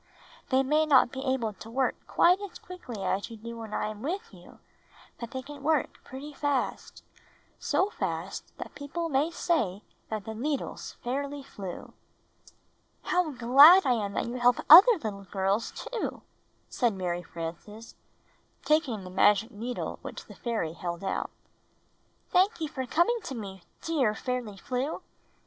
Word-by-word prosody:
They 265 0 +3
may 305 +3 +2
not 260 -5 +5
be 265 0 -5
able 250 -5 0
to 220 +3 -11
work 255 +2 +1
quite 360 +2 +4
as 405 -2 -7
quickly 250 - -8
as 190 +3 -1
you 230 - -9
do 235 +2 -8
when 220 -2 -8
I - - -1
am 215 -1 -8
with 390 - -4
you, - - -15 0.6
but 235 - -6
they 260 +2 -5
can 285 +1 -10
work 305 0 0
pretty 280 +3 -9
fast 285 -2 -2 0.3
— - - -34
so 400 +2 +1
fast - - -4
that - - -8
people 330 +4 -4
may 285 +2 +2
say 310 - -1 0.3
that 215 -2 -4
the 220 - -5
needles 280 +6 -3
fairly 280 +3 -3
flew." 195 -8 -8 1.1
"How 360 -2 +1
glad 280 +8 +8
I 260 - +3
am 205 -4 -2
that - - -1
you 240 +2 -4
help 245 0 +5 0.2
other 390 +10 +11
little 200 -2 -5
girls, 195 +3 0
too," 485 - -5 0.4
said 235 -5 0
Mary 175 -2 -2
Frances, 175 +7 -8 0.7
taking 300 - +1
the 185 - -9
magic 205 +4 +3
needle 240 +3 -5
which - - -8
the - - -12
fairy 220 -10 -3
held 170 +1 -5
out. 195 - -2 1.0
"Thank 380 +3 +3
you 315 - -2
for 260 -4 -5
coming 345 - +2
to 265 - -5
me, 195 -4 -7 0.2
dear 270 -10 +1
Fairly 245 -4 -4
Flew!" 255 +8 -3
250 Hz, 160 wpm, -28 LUFS, 210-300 Hz, 1.1 s, other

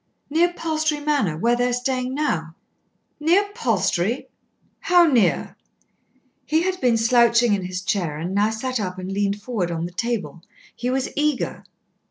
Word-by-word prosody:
"Near 340 +3 +3
Palstrey 310 -2 -1
Manor, 285 - 0
where 235 +8 +2
they 245 +1 +1
are - - -1
staying 255 +1 -1
now." 165 - -2 0.6
"Near 345 +7 +3
Palstrey! 220 - 0 0.5
How 355 -3 +5
near?" 255 -10 +2 0.9
He 315 +2 +1
had 370 0 -2
been 240 -2 +3
slouching 235 0 +4
in 195 -2 -1
his 185 0 -5
chair 175 -7 -1
and 170 +4 -4
now 205 +2 +2
sat 255 +3 -3
up 185 -3 -4
and 185 +1 -5
leaned 200 +1 -1
forward 205 -5 -2
on 165 -1 -3
the 175 - -6
table. 180 -7 -3 0.3
He 245 - -3
was 260 +1 -1
eager. 295 -2 -1
235 Hz, 160 wpm, -22 LUFS, 190-290 Hz, 0.9 s, How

